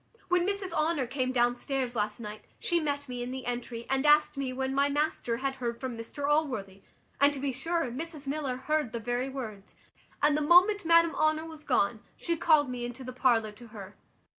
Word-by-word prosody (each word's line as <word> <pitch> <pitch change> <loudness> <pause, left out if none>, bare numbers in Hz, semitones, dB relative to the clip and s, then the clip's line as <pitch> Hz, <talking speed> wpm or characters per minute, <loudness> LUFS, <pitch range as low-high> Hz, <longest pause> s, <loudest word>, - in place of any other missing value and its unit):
When 360 0 +3
Mrs 400 -2 -2
Honour 310 -3 +1
came 255 0 -1
downstairs 245 +1 0
last 210 0 -1
night 210 -1 -7 0.2
she 345 - +1
met 285 -2 -2
me 250 -1 -5
in 245 - -4
the 260 0 -6
entry, 240 -1 -4
and 270 0 +1
asked 300 0 +5
me 275 -2 -2
when 265 +1 -2
my 280 +1 +3
master 290 -5 -1
had 270 +1 -2
heard 235 -2 -3
from 260 -2 -4
Mr 255 +5 -5
Allworthy; 255 -11 0 0.4
and 280 +1 +6
to - - -5
be 275 0 -1
sure 330 +7 -1
Mrs 305 +2 -5
Miller 275 -2 -2
heard 300 -2 -1
the 235 - -2
very 245 +3 -2
words; 220 -7 -7 0.4
and 295 0 +3
the 305 - +1
moment 360 +6 +5
Madam 335 0 +5
Honour 310 +1 +1
was 315 -2 -10
gone, 235 -4 +1 0.2
she 340 - -1
called 310 -3 +4
me 250 -1 -4
into 245 +2 -6
the 255 0 -7
parlour 235 -4 +2
to 230 +3 -14
her. 205 -3 -10
270 Hz, 205 wpm, -29 LUFS, 240-305 Hz, 0.4 s, and